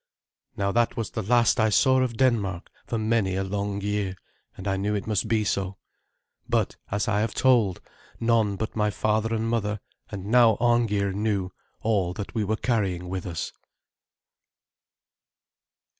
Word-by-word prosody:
Now 100 0 0
that 120 +3 +1
was 115 - -3
the 110 - -3
last 120 +3 +3
I 110 0 +4
saw 130 +5 +4
of 125 -3 0
Denmark 105 -8 +1 0.2
for 115 - -1
many 110 -4 +1
a 95 - 0
long 100 +1 -2
year, 100 -2 -1 0.4
and 95 - -6
I 95 - +1
knew 100 +2 -1
it 100 - -3
must 105 -4 0
be 110 -2 +2
so. 100 -2 -2 0.7
But, - - +1
as 100 -1 -1
I 105 -1 +2
have 110 +1 -1
told, 115 -8 +3 0.4
none 115 -3 +2
but 110 +2 -4
my 105 -1 +2
father 110 +2 0
and 110 +1 -1
mother, 105 -2 -1 0.3
and 100 -2 -6
now 115 0 +5
Arngeir, 115 -4 +2
knew 100 -2 -1 0.3
all 100 -5 +1
that 100 - -6
we 110 -3 0
were 105 +2 0
carrying 95 -8 -1
with 95 0 -4
us. 85 -2 -4
105 Hz, 160 wpm, -26 LUFS, 100-115 Hz, 0.7 s, now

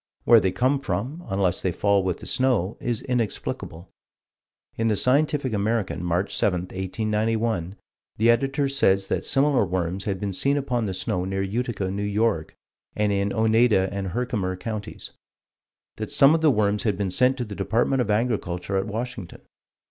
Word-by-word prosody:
Where 115 -1 +7
they 95 - +1
come 130 +7 +1
from, 135 - -4
unless 95 -2 0
they 95 - 0
fall 100 +3 +2
with 90 -2 -2
the - - -9
snow 120 -7 +1
is 120 -2 -2
inexplicable." 110 -7 -3 0.8
In 115 - 0
the 110 - +2
Scientific 135 +2 +1
American, 105 -4 -1
March 90 +3 -1
7, 90 -3 +1
1891, 105 +1 -2 0.4
the 115 +2 +5
Editor 135 +4 +1
says 100 -8 +2
that - - -1
similar 140 -2 +3
worms 95 0 -2
had 95 -3 -2
been 100 -1 -3
seen 140 +9 +1
upon 125 -5 -1
the 95 - -3
snow 90 -1 -2
near 95 +1 -2
Utica, 115 +1 -2
N.Y., 100 -2 0 0.5
and 105 -1 +1
in 100 0 0
Oneida 110 -3 +3
and 100 -1 -3
Herkimer 95 -3 -2
Counties; 105 +1 -6 0.9
that - - -4
some 140 +2 +5
of 165 - +1
the 160 - +5
worms 105 -4 +1
had 105 -5 0
been 100 -2 -1
sent 125 +7 +3
to 125 - -3
the 105 - -8
Department 115 +6 +1
of 115 - -2
Agriculture 105 -4 -1
at 95 - -1
Washington. 110 -4 -6
105 Hz, 165 wpm, -24 LUFS, 95-120 Hz, 0.9 s, Where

